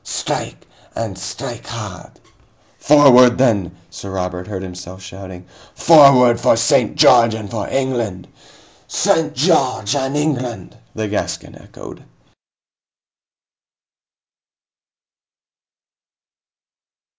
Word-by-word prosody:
Strike - - -5 0.3
and 110 -4 -5
strike 95 0 -8
hard!" - - -9 0.7
"Forward 125 -4 +5
then!" 100 -9 0
Sir 100 +3 -9
Robert 90 -1 -5
heard 95 -3 -6
himself 90 0 -10
shouting. 95 0 -11 0.3
"Forward 140 -7 +5
for - - +2
St. - - +1
George 115 -2 +4
and 105 -2 -8
for 110 -4 -4
England!" 120 -9 -3 0.6
"St. 160 -1 0
George 130 - 0
and 135 +1 -2
England!" 125 - -4 0.2
the 110 -1 -3
Gascon 105 - -5
echoed. - - -13
115 Hz, 85 wpm, -17 LUFS, 95-135 Hz, 0.7 s, Forward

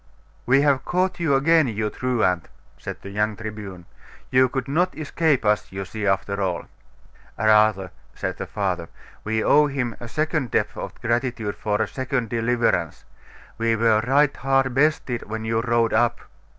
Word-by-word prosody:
'We 135 +3 +5
have 140 -3 +2
caught 185 0 0
you 160 -5 +2
again, 160 +2 +4
you 110 -2 -2
truant!' 110 - 0 0.3
said - - -7
the 100 - -8
young 105 +1 0
Tribune; 105 -5 -8 0.5
'you 130 0 +4
could 135 +1 -3
not 175 +6 0
escape 155 -3 0
us, 105 0 +1
you 95 0 -5
see, 105 +2 -4
after 100 +1 0
all.' 90 -3 -2 0.7
'Rather,' 105 -3 +3 0.2
said - - -4
the - - -5
father, 90 -4 -2 0.3
'we 110 +1 -1
owe 150 0 +5
him 130 -5 -3
a 120 - -7
second 155 0 -1
debt - - +1
of - - -7
gratitude 120 -3 -1
for 105 -1 -1
a - - -3
second 130 -3 -2
deliverance. 115 -8 0 0.5
We 115 0 +2
were 110 -1 +3
right 145 +2 +3
hard 135 -1 +1
bested 135 -5 0
when 110 0 -4
you 115 0 0
rode 120 -1 +1
up. 120 +2 +2
115 Hz, 165 wpm, -23 LUFS, 105-135 Hz, 0.7 s, We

